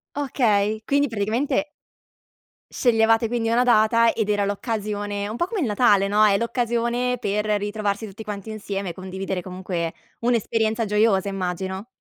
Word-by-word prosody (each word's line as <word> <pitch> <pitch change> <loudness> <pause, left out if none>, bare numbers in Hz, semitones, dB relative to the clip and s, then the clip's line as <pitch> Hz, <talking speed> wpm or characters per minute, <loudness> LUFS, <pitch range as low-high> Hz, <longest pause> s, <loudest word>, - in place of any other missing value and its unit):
Okay, 220 -7 +1
quindi 285 +1 +2
praticamente 235 +7 -1 1.0
sceglievate 225 -1 +3
quindi 230 -1 -1
una 240 +2 +3
data 230 0 +4
ed 215 -2 -1
era 205 -1 +2
l'occasione 205 -1 -3
un 220 - -5
po' 345 - 0
come 405 -1 -3
il - - +1
Natale, 205 -3 +3
no, 210 +2 +3
è 205 -2 +5
l'occasione 235 +2 0
per 210 -1 -1
ritrovarsi 210 0 -1
tutti 215 +2 -9
quanti 210 0 -6
insieme, 200 -3 -4
condividere 190 0 -4
comunque 180 -2 -4 0.3
un'esperienza 225 -1 0
gioiosa 210 -2 +2
immagino. 190 +1 -4
215 Hz, 140 wpm, -23 LUFS, 200-235 Hz, 1.0 s, è